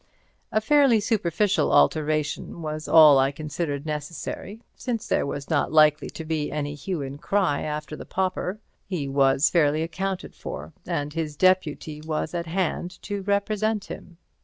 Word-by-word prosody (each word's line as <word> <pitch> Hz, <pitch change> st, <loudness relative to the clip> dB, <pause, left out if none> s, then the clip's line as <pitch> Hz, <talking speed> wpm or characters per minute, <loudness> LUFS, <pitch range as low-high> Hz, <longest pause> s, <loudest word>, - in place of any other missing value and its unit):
A 215 Hz, -, +3 dB
fairly 270 Hz, 0 st, +4 dB
superficial 205 Hz, -2 st, +1 dB
alteration 155 Hz, -, +1 dB
was 155 Hz, 0 st, -4 dB
all 150 Hz, -4 st, +8 dB
I 135 Hz, +1 st, +3 dB
considered 145 Hz, 0 st, -4 dB
necessary, 160 Hz, +8 st, -5 dB
since 235 Hz, -4 st, -4 dB
there -, -, +1 dB
was 140 Hz, 0 st, -5 dB
not 155 Hz, -3 st, +1 dB
likely 155 Hz, -1 st, +4 dB
to 160 Hz, -, -8 dB
be 155 Hz, -2 st, -2 dB
any 145 Hz, 0 st, -3 dB
hue 150 Hz, +2 st, -4 dB
and 140 Hz, +1 st, -7 dB
cry 190 Hz, -8 st, +1 dB
after 150 Hz, 0 st, -4 dB
the -, -, -8 dB
pauper. 185 Hz, +1 st, -2 dB, 0.3 s
He 175 Hz, -8 st, -3 dB
was 135 Hz, 0 st, +3 dB
fairly 155 Hz, -2 st, +3 dB
accounted 185 Hz, +3 st, -4 dB
for, 75 Hz, +2 st, -7 dB
and 150 Hz, -4 st, -2 dB
his 155 Hz, -2 st, -3 dB
deputy 160 Hz, -4 st, +1 dB
was 155 Hz, +1 st, -3 dB
at 170 Hz, -1 st, -3 dB
hand 180 Hz, +1 st, -2 dB
to 205 Hz, -1 st, -4 dB
represent 205 Hz, +1 st, 0 dB
him. 170 Hz, -, -10 dB
160 Hz, 155 wpm, -25 LUFS, 150-190 Hz, 0.3 s, all